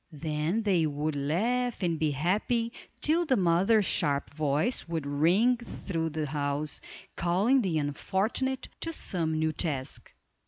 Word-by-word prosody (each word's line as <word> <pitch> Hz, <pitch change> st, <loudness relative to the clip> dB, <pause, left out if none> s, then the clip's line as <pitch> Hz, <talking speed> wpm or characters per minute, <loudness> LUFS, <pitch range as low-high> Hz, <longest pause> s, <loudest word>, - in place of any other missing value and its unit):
Then 155 Hz, +7 st, -1 dB
they 180 Hz, -6 st, +2 dB
would 150 Hz, +1 st, -2 dB
laugh 220 Hz, -, 0 dB
and 170 Hz, -3 st, 0 dB
be 155 Hz, -, +2 dB
happy, 210 Hz, -, 0 dB, 0.3 s
till 325 Hz, +3 st, +3 dB
the 275 Hz, -6 st, +2 dB
mother's 190 Hz, +4 st, +3 dB
sharp 145 Hz, -6 st, +1 dB
voice 150 Hz, -, 0 dB
would 165 Hz, -3 st, -3 dB
ring 175 Hz, +13 st, +3 dB
through 170 Hz, -8 st, -4 dB
the 155 Hz, 0 st, -3 dB
house, 145 Hz, +1 st, -1 dB, 0.3 s
calling 195 Hz, +10 st, +2 dB
the 180 Hz, -7 st, 0 dB
unfortunate 195 Hz, -, -1 dB
to 330 Hz, -, -3 dB
some 160 Hz, -, 0 dB
new 160 Hz, 0 st, +1 dB
task. 145 Hz, -4 st, -3 dB
170 Hz, 135 wpm, -29 LUFS, 150-220 Hz, 0.3 s, till